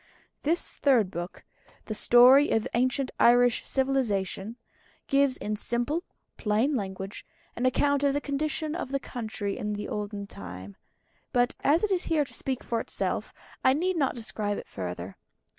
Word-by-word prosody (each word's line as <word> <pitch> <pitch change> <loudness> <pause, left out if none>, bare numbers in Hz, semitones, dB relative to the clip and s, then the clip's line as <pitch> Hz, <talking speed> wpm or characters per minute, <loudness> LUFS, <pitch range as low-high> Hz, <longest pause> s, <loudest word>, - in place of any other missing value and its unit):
This 330 +4 0
Third 240 -9 +3
book 175 +2 -6 0.4
"The 215 - -4
Story 250 +6 +7
of 220 - +1
Ancient 255 +2 +1
Irish 245 0 +5
Civilisation" 230 -6 0 0.5
gives 275 -1 +2
in 210 0 -3
simple, 240 +10 -1 0.3
plain 225 +7 +1
language, 195 -2 -5 0.3
an 250 +2 +1
account 285 +2 +2
of 280 -1 +3
the - - +2
condition 300 +2 -2
of 345 -6 -4
the 275 - 0
country 215 -6 -4
in 210 0 -2
the 205 0 -4
olden 205 -1 -4
time; 95 - -9 0.6
but 245 +1 +2
as 315 +6 +3
it 425 - +1
is 370 -2 +1
here 310 -3 +2
to - - -14
speak 260 -2 -3
for 230 - -1
itself, - - -2 0.3
I 260 - +5
need 360 +6 0
not 280 -6 +1
describe 215 -3 -3
it - - -7
further. 90 0 -6
245 Hz, 160 wpm, -28 LUFS, 205-280 Hz, 0.6 s, Story